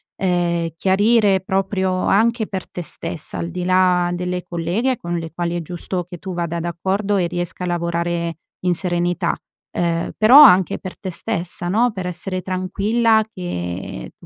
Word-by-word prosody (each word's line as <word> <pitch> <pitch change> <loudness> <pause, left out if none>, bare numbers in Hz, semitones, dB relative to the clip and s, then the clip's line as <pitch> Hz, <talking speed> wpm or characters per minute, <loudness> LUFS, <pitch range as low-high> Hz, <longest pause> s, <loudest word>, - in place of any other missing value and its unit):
ehm, 175 -2 0
chiarire 200 +1 +3
proprio 190 0 0
anche 225 +2 +2
per 190 -3 -5
te 175 - -6
stessa, 155 -1 -6
al 170 - -3
di 180 +1 -4
là 180 -1 +3
delle 180 0 -2
colleghe 180 +9 -1
con 175 -2 -3
le 165 -1 -5
quali 175 0 -2
è - - -3
giusto 175 +2 -4
che 175 - -7
tu 185 +2 -6
vada 170 -1 -2
d'accordo 190 +5 -1
e 180 -2 +1
riesca 175 +1 -4
a - - -2
lavorare 170 -1 -1 0.3
in 180 -1 +2
serenità. 175 -1 0 0.4
Ehm, 170 -1 -1
però 245 +7 +9
anche 190 - +6
per 185 - -8
te 190 - -5
stessa, 175 -2 -4
no? 235 +6 +3
Per 185 -2 -4
essere 185 +1 -4
tranquilla 210 +5 +1
che 90 - -5
180 Hz, 160 wpm, -20 LUFS, 170-195 Hz, 0.4 s, però